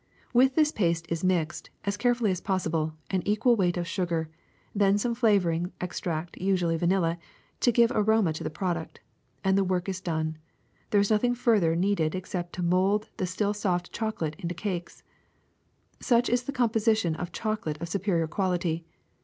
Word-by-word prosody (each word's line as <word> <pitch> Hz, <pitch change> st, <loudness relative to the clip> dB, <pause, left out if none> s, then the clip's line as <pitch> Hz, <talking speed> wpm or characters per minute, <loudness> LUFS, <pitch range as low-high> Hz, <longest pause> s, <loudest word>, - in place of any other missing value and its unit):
With 260 Hz, +2 st, +4 dB
this, 305 Hz, -1 st, +4 dB
paste 170 Hz, -, 0 dB
is 165 Hz, +1 st, -2 dB
mixed, 175 Hz, -3 st, 0 dB, 0.2 s
as 200 Hz, 0 st, 0 dB
carefully 240 Hz, -1 st, +2 dB
as 185 Hz, -1 st, -3 dB
possible, 160 Hz, -5 st, -1 dB, 0.2 s
an 190 Hz, -2 st, +1 dB
equal 215 Hz, +4 st, +3 dB
weight 180 Hz, -4 st, +1 dB
of 175 Hz, -1 st, -2 dB
sugar, 170 Hz, -3 st, -2 dB, 0.4 s
then 200 Hz, -1 st, +3 dB
some 235 Hz, +3 st, 0 dB
flavoring 185 Hz, -7 st, +2 dB
extract, 170 Hz, -2 st, -4 dB
usually 180 Hz, -3 st, +1 dB
vanilla, 170 Hz, 0 st, +1 dB, 0.4 s
to 240 Hz, -, +4 dB
give 235 Hz, +1 st, +4 dB
aroma 215 Hz, -5 st, +3 dB
to 155 Hz, -, -6 dB
the -, -, -2 dB
product; 170 Hz, 0 st, -3 dB, 0.4 s
and 190 Hz, 0 st, +3 dB
the 195 Hz, -, +3 dB
work 180 Hz, -1 st, -1 dB
is 185 Hz, -1 st, -3 dB
done. 160 Hz, -3 st, -2 dB, 0.5 s
There 205 Hz, -, +4 dB
is 200 Hz, -, 0 dB
nothing 245 Hz, +3 st, +3 dB
further 210 Hz, -9 st, +3 dB
needed 175 Hz, -3 st, +1 dB
except 180 Hz, -1 st, -4 dB
to 180 Hz, -, -3 dB
mold 190 Hz, +4 st, +2 dB
the 185 Hz, -4 st, -1 dB
still 200 Hz, +3 st, 0 dB
soft 180 Hz, -4 st, -1 dB
chocolate 195 Hz, -9 st, -2 dB
into 175 Hz, -2 st, -4 dB
cakes. 180 Hz, -2 st, -5 dB, 1.0 s
^^Such 240 Hz, 0 st, +2 dB
is 245 Hz, +1 st, +1 dB
the 280 Hz, -, -2 dB
composition 220 Hz, -, +2 dB
of 175 Hz, +2 st, -5 dB
chocolate 175 Hz, -7 st, -3 dB
of 170 Hz, -, -4 dB
superior 175 Hz, -2 st, 0 dB
quality. 175 Hz, -2 st, -1 dB
185 Hz, 170 wpm, -27 LUFS, 170-215 Hz, 1.0 s, With